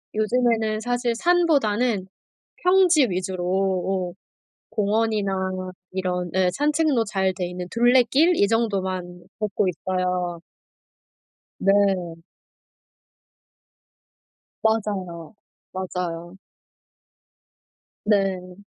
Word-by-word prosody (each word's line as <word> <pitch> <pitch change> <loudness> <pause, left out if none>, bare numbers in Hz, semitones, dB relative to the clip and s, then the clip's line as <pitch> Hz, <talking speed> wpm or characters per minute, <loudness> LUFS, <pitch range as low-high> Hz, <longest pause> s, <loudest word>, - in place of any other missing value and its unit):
요즘에는 220 -1 +1
사실 245 +1 -1
산보다는 245 - +2 0.6
평지 360 -6 +5
위주로 185 0 -3
오 190 -1 0 0.6
공원이나 210 -1 0 0.6
이런 180 -2 -2
예 185 -1 +3
산책로 295 - +1
잘 190 -2 0
돼 180 -1 -3
있는 180 0 -6
둘레길 255 +8 +4
이 200 - +4
정도만 190 -6 -1 0.2
걷고 210 -2 0
있어요. 180 -1 -2 1.2
네. 195 -4 +2 2.5
맞아요. 200 -6 -1 0.4
맞아요. 180 -1 -5 1.7
네. 190 -3 0
195 Hz, 160 characters per minute, -23 LUFS, 180-230 Hz, 2.5 s, 평지